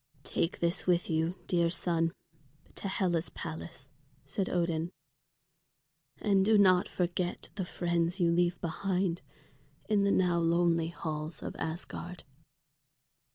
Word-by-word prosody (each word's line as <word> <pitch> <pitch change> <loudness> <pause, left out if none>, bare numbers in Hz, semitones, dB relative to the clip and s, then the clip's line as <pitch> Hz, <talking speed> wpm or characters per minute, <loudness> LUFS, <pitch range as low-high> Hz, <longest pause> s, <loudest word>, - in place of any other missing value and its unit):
"Take 165 - -1
this 170 +1 0
with 175 -1 +2
you, 160 +2 +1
dear 170 -2 +2
son, 165 -1 +1 0.6
to - - -5
Hela's 180 -3 0
palace," 155 -3 -7 0.3
said 195 -2 -2
Odin. 170 -1 0 1.3
"And 195 -3 +3
do 215 +2 +5
not 185 -3 +5
forget 175 0 -2
the 195 -2 -3
friends 170 +1 0
you 170 -2 +4
leave 175 +1 +2
behind 180 +1 -1 0.7
in 210 -2 +3
the 200 - +3
now 180 -2 +3
lonely 165 0 +3
halls 155 -1 -5
of - - -5
Asgard." 175 +2 -5
175 Hz, 120 wpm, -31 LUFS, 165-185 Hz, 1.3 s, do